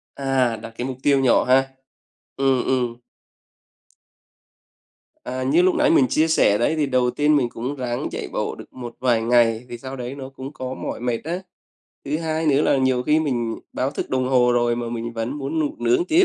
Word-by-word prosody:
À, 130 -4 +1
đặt 115 0 -9
cái 125 - -3
mục 130 -1 -5
tiêu 140 -1 +4
nhỏ 130 -2 +4
ha. 135 +1 +3 0.7
Ừm, 135 -2 +2
ừm. 125 -2 0 2.3
À, 130 +1 -4
như 150 +7 +3
lúc 185 0 +3
nãy - - +3
mình 135 -5 +5
chia 155 +6 +2
sẻ 105 -10 +3
đấy 135 +7 +1
thì 150 -2 +1
đầu 125 -2 +1
tiên 150 +1 +2
mình 125 -4 +2
cũng 125 +6 -5
ráng 125 -2 -3
chạy - - -4
bộ - - -2
được - - -13
một 120 -2 -8
vài 120 -3 +2
ngày, 115 0 +3
thì 120 - -6
sau 130 +2 -7
đấy 125 +1 -6
nó 135 -1 -7
cũng 135 +2 -9
có 130 -2 -5
mỏi - - -5
mệt 120 0 -2
á. 175 +4 -3 0.6
Thứ 150 +3 -1
hai 160 -1 -2
nữa 145 0 +4
là - - +3
nhiều 130 -1 +1
khi 150 +3 +3
mình 120 -6 -2
báo 130 +2 -1
thức - - -5
đồng 130 -1 0
hồ 125 -2 +4
rồi, 120 -1 +2
mà 120 -1 -3
mình 115 0 -4
vẫn 115 +5 -4
muốn 145 +4 -3
ngủ 150 -2 -1
nướng 120 +8 +2
tiếp. 340 - +4
130 Hz, 210 wpm, -22 LUFS, 120-140 Hz, 2.3 s, mình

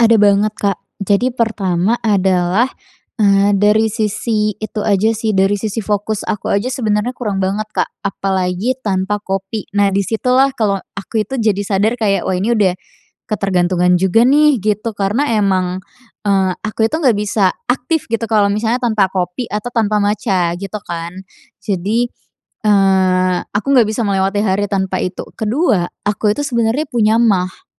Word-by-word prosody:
Ada 230 -1 +5
banget, 205 +1 +3
Kak. 200 -2 0 0.2
Jadi 205 +6 +1
pertama 210 -4 0
adalah, 190 0 +2 0.5
eee, 200 -2 +3
dari 210 +2 +3
sisi 215 0 -1
itu 215 0 -5
aja 205 +1 +2
sih, 220 0 -1
dari 195 +1 +2
sisi 220 +2 -3
fokus 210 +1 -2
aku 210 - -2
aja 205 +5 0
sebenarnya 225 -2 -1
kurang 205 -6 -2
banget, 195 +3 -1
Kak, - - 0 0.2
apalagi 195 +4 -1
tanpa 195 0 0
kopi. 195 +2 -4
Nah, 200 -1 +3
di 200 - +2
situlah 255 +4 +2
kalau 210 -6 0 0.2
aku 210 +2 -3
itu 265 +5 -4
jadi 210 -3 +1
sadar 210 +4 +1
kayak, 205 -4 0
wah, 185 - 0
ini 215 +6 +1
udah 200 -5 +2 0.6
ketergantungan 180 -3 +1
juga 190 +5 +3
nih, 295 +1 +4
gitu. 215 +2 -1
Karena 210 +9 0
emang, 185 -2 0 0.4
eee, 195 -2 +2
aku 220 +1 -1
itu 310 - -3
nggak 250 -8 +3
bisa 205 -2 +1 0.2
aktif 265 +6 0
gitu 230 0 0
kalau 210 -2 +3
misalnya 225 +3 0
tanpa 215 -5 +2
kopi 180 +5 -3
atau 210 +3 -3
tanpa 215 -2 +1
matcha, 195 -4 0
gitu 200 +2 -5
kan. 170 0 -5 0.5
Jadi, 205 +5 0 0.6
eee, 190 -3 +3
aku 205 +6 -2
nggak 240 -5 +5
bisa 220 +1 -1
melewati 195 +1 0
hari 200 +1 0
tanpa 190 -1 -1
itu. 180 0 -4
Kedua, 220 - +1 0.2
aku 210 +1 0
itu 290 - -2
sebenarnya 235 +3 0
punya 220 -2 +2
maag. 195 - 0
205 Hz, 160 wpm, -16 LUFS, 195-225 Hz, 0.6 s, Ada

